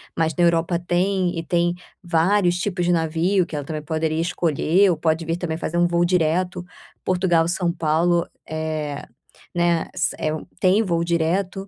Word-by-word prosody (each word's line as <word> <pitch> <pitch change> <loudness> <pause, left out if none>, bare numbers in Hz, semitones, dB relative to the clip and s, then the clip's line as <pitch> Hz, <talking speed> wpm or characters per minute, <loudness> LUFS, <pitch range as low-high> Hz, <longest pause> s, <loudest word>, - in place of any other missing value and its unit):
mas 160 -1 0
na 175 - +2
Europa 170 0 +2
tem 180 +1 0
e - - -4
tem 175 +1 +1 0.3
vários 175 +2 +2
tipos 180 -3 -1
de 175 - +2
navio 170 +3 +1
que 160 - -7
ela 145 -2 -4
também 155 -1 -4
poderia 155 +1 -1
escolher 175 +2 +2
ou 165 - -1
pode 160 +1 0
vir 165 +1 -1
também 160 -3 -3
fazer 170 0 -3
um 175 0 +4
voo 170 0 +2
direto, 180 +1 0 0.4
Portugal 175 -3 +2
São 175 -1 0
Paulo, 170 +1 +1 0.2
eh, 155 -2 -3 0.5
né, 170 -1 +1
s - - 0
é 155 - 0
um 155 - -6
tem 190 +4 +3
voo 170 -4 0
direto, 180 +4 -1
170 Hz, 175 wpm, -22 LUFS, 160-180 Hz, 0.5 s, um